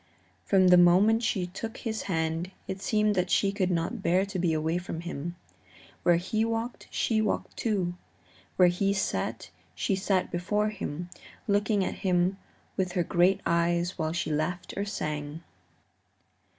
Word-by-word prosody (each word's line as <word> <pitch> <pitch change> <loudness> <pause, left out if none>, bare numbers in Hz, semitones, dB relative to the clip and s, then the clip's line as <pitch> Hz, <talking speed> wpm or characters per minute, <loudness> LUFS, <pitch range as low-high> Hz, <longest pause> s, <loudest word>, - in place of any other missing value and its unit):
From 190 -2 +4
the 180 0 +8
moment 195 +6 +5
she 215 -6 0
took 220 +6 -6
his 220 -3 -3
hand 160 0 -1 0.2
it 190 0 -5
seemed 210 0 +2
that 180 -2 0
she 195 +2 +3
could 195 -2 0
not 180 +6 -1
bear 185 +2 +2
to 195 -2 -4
be 175 -1 +2
away 160 +2 0
from 165 -2 -6
him. 170 0 -5 0.7
Where 175 - +4
he 200 +6 0
walked, 230 +1 -3
she 220 -2 +1
walked 215 - -2
too; 195 -6 -1 0.6
where 180 -1 +6
he 195 +3 +1
sat 115 - -2 0.2
she 90 - 0
sat 190 -1 0
before 210 +5 0
him, 175 -4 -5 0.4
looking 205 -1 +2
at - - -4
him 185 0 +2 0.4
with 185 -2 -1
her 180 - +1
great 180 +4 +3
eyes 170 +1 +1
while 155 0 0
she 170 -1 -2
laughed 175 +4 -2
or 200 - -2
sang. 150 -5 -4
180 Hz, 160 wpm, -28 LUFS, 170-200 Hz, 0.7 s, the